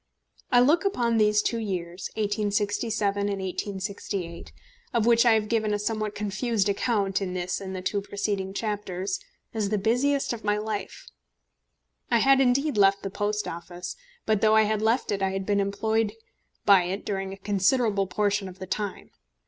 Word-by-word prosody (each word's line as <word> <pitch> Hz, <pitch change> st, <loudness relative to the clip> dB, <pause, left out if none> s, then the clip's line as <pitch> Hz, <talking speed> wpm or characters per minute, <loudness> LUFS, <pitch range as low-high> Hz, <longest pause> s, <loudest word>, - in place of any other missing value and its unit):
I 245 Hz, -1 st, +6 dB
look 300 Hz, +9 st, +4 dB
upon 240 Hz, -, +1 dB
these 210 Hz, 0 st, +4 dB
two 230 Hz, -, 0 dB
years, 180 Hz, -4 st, -4 dB
1867 205 Hz, 0 st, 0 dB
and 200 Hz, -1 st, -1 dB
1868, 190 Hz, -2 st, -4 dB, 0.4 s
of 230 Hz, -2 st, +3 dB
which 235 Hz, 0 st, +5 dB
I 230 Hz, -, +7 dB
have 215 Hz, -1 st, +1 dB
given 215 Hz, -2 st, +1 dB
a -, -, 0 dB
somewhat 215 Hz, 0 st, -2 dB
confused 210 Hz, +1 st, 0 dB
account 200 Hz, -1 st, 0 dB
in 185 Hz, -2 st, -3 dB
this 180 Hz, +2 st, -2 dB
and 190 Hz, -1 st, -5 dB
the 185 Hz, -, -5 dB
two 200 Hz, +2 st, 0 dB
preceding 200 Hz, -1 st, -2 dB
chapters, 200 Hz, -3 st, -3 dB, 0.3 s
as 215 Hz, -3 st, -1 dB
the 210 Hz, -, +1 dB
busiest 245 Hz, +7 st, +1 dB
in 235 Hz, -, -5 dB
my 210 Hz, -1 st, +1 dB
life. 210 Hz, -2 st, -4 dB, 1.0 s
I 235 Hz, -, +4 dB
had 270 Hz, +3 st, +5 dB
indeed 270 Hz, +1 st, +2 dB
left 195 Hz, 0 st, +4 dB
the 195 Hz, -, -4 dB
Post 210 Hz, +1 st, -1 dB
Office, 175 Hz, +1 st, -6 dB, 0.3 s
but 215 Hz, -2 st, +1 dB
though 215 Hz, 0 st, +5 dB
I 220 Hz, -, +6 dB
had 215 Hz, 0 st, 0 dB
left 225 Hz, +3 st, +1 dB
it 200 Hz, -1 st, -1 dB
I 195 Hz, -, +2 dB
had 195 Hz, 0 st, -3 dB
been 205 Hz, 0 st, +1 dB
employed 210 Hz, +2 st, 0 dB, 0.5 s
by 195 Hz, -3 st, +6 dB
it 190 Hz, +3 st, -4 dB
during 195 Hz, -1 st, -3 dB
a 195 Hz, -, -7 dB
considerable 200 Hz, +1 st, +1 dB
portion 200 Hz, 0 st, 0 dB
of 185 Hz, -, -12 dB
the 185 Hz, -, -7 dB
time. 195 Hz, +1 st, -4 dB
205 Hz, 175 wpm, -26 LUFS, 195-220 Hz, 1.0 s, I